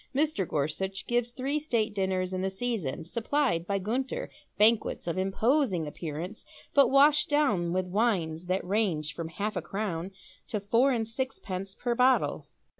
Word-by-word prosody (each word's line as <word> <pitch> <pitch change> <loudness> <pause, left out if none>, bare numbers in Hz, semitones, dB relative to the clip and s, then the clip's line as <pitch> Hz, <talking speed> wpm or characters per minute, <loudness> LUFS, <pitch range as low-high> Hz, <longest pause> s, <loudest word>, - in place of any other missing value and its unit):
Mr. 290 - +1
Gorsuch 155 +7 -2
gives 240 0 0
three 275 +4 -1
state 230 -8 0
dinners 190 -2 -1
in 185 - -1
the 190 - 0
season, 190 - -3
supplied 205 - 0
by 200 - +1
Gunter, 255 - -2 0.3
banquets 215 +2 +3
of 170 - -2
imposing 195 - +1
appearance, 165 +6 -6 0.3
but 280 -4 +6
washed 290 +3 +5
down 220 - +2
with 185 +1 0
wines 180 -5 0
that 185 +1 0
range 180 -7 0
from 165 -1 -5
half 205 +6 -3
a - - -1
crown 190 -4 -3 0.4
to 210 - -2
four 230 +7 +3
and 225 -3 0
sixpence 200 -6 -4
per 240 -1 -1
bottle. 255 +2 +2
205 Hz, 155 wpm, -29 LUFS, 180-245 Hz, 0.4 s, but